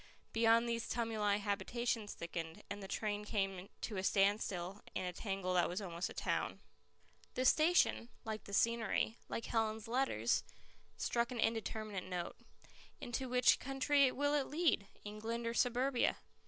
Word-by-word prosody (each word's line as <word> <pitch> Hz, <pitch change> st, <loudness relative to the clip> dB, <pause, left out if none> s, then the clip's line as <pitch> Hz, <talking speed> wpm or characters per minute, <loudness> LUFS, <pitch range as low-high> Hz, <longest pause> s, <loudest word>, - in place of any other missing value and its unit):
Beyond 230 Hz, +1 st, +4 dB
these 230 Hz, -1 st, -2 dB
tumuli 220 Hz, -3 st, +1 dB
habitations 210 Hz, +2 st, -1 dB
thickened, 165 Hz, -1 st, -5 dB
and 205 Hz, 0 st, -4 dB
the 195 Hz, -, -6 dB
train 210 Hz, +1 st, -2 dB
came 195 Hz, -3 st, -2 dB
to 210 Hz, -, -3 dB
a 190 Hz, -, -1 dB
standstill 195 Hz, -1 st, +1 dB
in -, -, -1 dB
a 180 Hz, -, -3 dB
tangle 195 Hz, -2 st, -2 dB
that 175 Hz, -1 st, +3 dB
was 180 Hz, +3 st, -2 dB
almost 175 Hz, -3 st, -3 dB
a -, -, -8 dB
town. -, -, -1 dB, 0.8 s
The 255 Hz, -, 0 dB
station, 310 Hz, -5 st, +4 dB, 0.2 s
like 220 Hz, -1 st, -4 dB
the -, -, -9 dB
scenery, 225 Hz, +1 st, +1 dB
like 230 Hz, -, -3 dB
Helen's 220 Hz, -1 st, 0 dB
letters, 260 Hz, +4 st, +1 dB, 0.5 s
struck 235 Hz, 0 st, 0 dB
an 245 Hz, -, -4 dB
indeterminate 220 Hz, -3 st, -1 dB
note. 180 Hz, -2 st, -4 dB, 0.6 s
Into 250 Hz, +2 st, -3 dB
which 250 Hz, 0 st, +5 dB
country 270 Hz, 0 st, +3 dB
will 285 Hz, +2 st, +1 dB
it 285 Hz, -2 st, +2 dB
lead, 300 Hz, -, +2 dB, 0.2 s
England 220 Hz, +3 st, -4 dB
or 230 Hz, -, -1 dB
Suburbia? 245 Hz, +2 st, +2 dB
220 Hz, 150 wpm, -36 LUFS, 195-240 Hz, 0.8 s, which